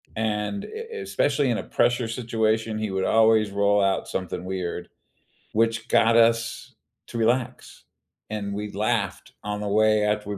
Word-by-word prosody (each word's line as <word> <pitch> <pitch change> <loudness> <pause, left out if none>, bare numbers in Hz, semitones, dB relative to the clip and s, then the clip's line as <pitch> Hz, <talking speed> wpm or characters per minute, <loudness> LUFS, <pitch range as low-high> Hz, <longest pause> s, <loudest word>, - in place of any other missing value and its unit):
And 110 - -2
e 455 +1 -8
especially 145 - +1
in 115 - +1
a - - -4
pressure 120 -1 +1
situation, 110 -2 -1
he 110 -2 -3
would 95 0 -1
always 110 -2 +4
roll 100 0 +2
out 95 -1 0
something 90 -1 -4
weird, 90 -1 -4 0.6
which 115 +1 +1
got 115 -1 +4
us 115 0 +2 0.3
to - - -6
relax, 120 +2 -1 0.5
and 100 -2 -4
we 105 +1 -4
laughed 105 -2 -2
on 105 0 -3
the 105 - -3
way 110 +1 +3
after 105 0 -1
we 100 - -3
110 Hz, 155 wpm, -25 LUFS, 105-115 Hz, 0.6 s, always